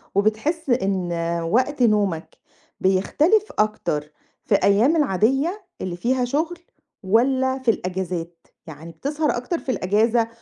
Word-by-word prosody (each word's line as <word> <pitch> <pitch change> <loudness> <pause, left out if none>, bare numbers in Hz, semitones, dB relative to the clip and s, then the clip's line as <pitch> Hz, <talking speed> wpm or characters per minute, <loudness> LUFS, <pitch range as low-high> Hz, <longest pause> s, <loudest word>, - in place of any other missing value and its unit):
وبتحس 220 - 0
إن 195 -7 0 0.4
وقت 260 +2 +1
نومك، 205 -7 +1 0.4
بيختلف 295 - +2
أكتر 150 -8 -1 0.3
في 205 - +3
أيّام 220 +12 +3
العاديّة، 280 - +1 0.2
اللي 180 -2 -3
فيها 250 +6 0
شغل 320 +7 -2 0.4
والّا 260 +6 +2
في 245 -3 +3
الأجازات؟ 180 -3 -5 0.2
يعني 160 +2 -10
بتسهر 295 - -1
أكتر 290 +8 -3
في 260 - -3
الأجازة 225 +4 +1
225 Hz, 115 wpm, -22 LUFS, 190-275 Hz, 0.4 s, في